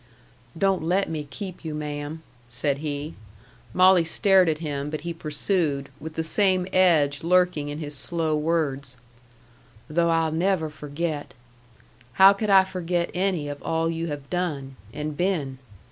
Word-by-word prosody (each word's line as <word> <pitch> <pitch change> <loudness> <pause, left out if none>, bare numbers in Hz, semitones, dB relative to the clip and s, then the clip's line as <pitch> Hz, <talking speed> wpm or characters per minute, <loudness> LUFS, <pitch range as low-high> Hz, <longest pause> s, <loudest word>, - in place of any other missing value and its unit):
"Don't 195 0 +2
let 180 +3 0
me 150 -2 -4
keep 185 +5 -7
you, 155 -2 -4
ma'am," 150 +1 -5 0.3
said 135 +3 -1
he. 150 0 -4 0.6
Molly 185 -1 +5
stared 185 +1 +4
at 155 - 0
him; 145 -3 -4
but 155 0 -4
he 170 +1 -4
pursued, 150 -2 0
with 155 +1 -8
the 160 - -1
same 185 +1 +2
edge 155 -6 +3
lurking 180 -4 +2
in 145 - -5
his 150 -2 -2
slow 160 +1 0
words: 145 -5 -1 0.9
"Though 170 +2 +1
I'll 165 -1 +2
never 165 -1 0
forget. 150 0 -5 0.8
How 195 +1 +8
could 210 +1 -3
I 195 -1 +7
forget 175 -2 -2
any 180 -5 0
of 145 0 -6
all 165 0 0
you 165 0 -3
have 145 -3 -6
done 150 -7 -3 0.2
and 150 +3 -5
been? 150 -7 -1
160 Hz, 150 wpm, -25 LUFS, 145-180 Hz, 0.9 s, How